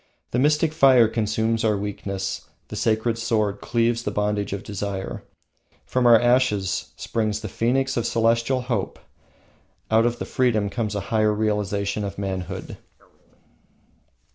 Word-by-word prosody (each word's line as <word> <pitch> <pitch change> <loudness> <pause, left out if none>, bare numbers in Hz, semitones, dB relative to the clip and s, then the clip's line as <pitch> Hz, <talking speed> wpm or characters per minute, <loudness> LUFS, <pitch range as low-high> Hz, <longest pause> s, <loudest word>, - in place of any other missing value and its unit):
The 120 - 0
mystic 150 +3 +2
fire 130 -6 +6
consumes 110 +1 0
our 105 -2 +2
weakness, 100 -1 -4 0.2
the - - -6
sacred 115 +1 0
sword 110 -3 0
cleaves 115 0 +1
the 110 - -2
bondage 105 0 -1
of 100 +1 -4
desire. 100 -2 -4 0.6
From 125 -1 +1
our 115 -2 +8
ashes 120 -6 +1
springs 105 -2 -2
the 110 - -5
phoenix 130 +6 0
of 120 - 0
celestial 115 +3 +1
hope, 120 -6 -2 0.9
out 115 +1 +4
of 120 0 -2
the - - -4
freedom 110 -6 +1
comes 110 -3 -2
a - - 0
higher 110 -1 +3
realisation 105 -1 -1
of 100 -1 -5
manhood. 95 -1 -5
110 Hz, 140 wpm, -23 LUFS, 100-120 Hz, 0.9 s, our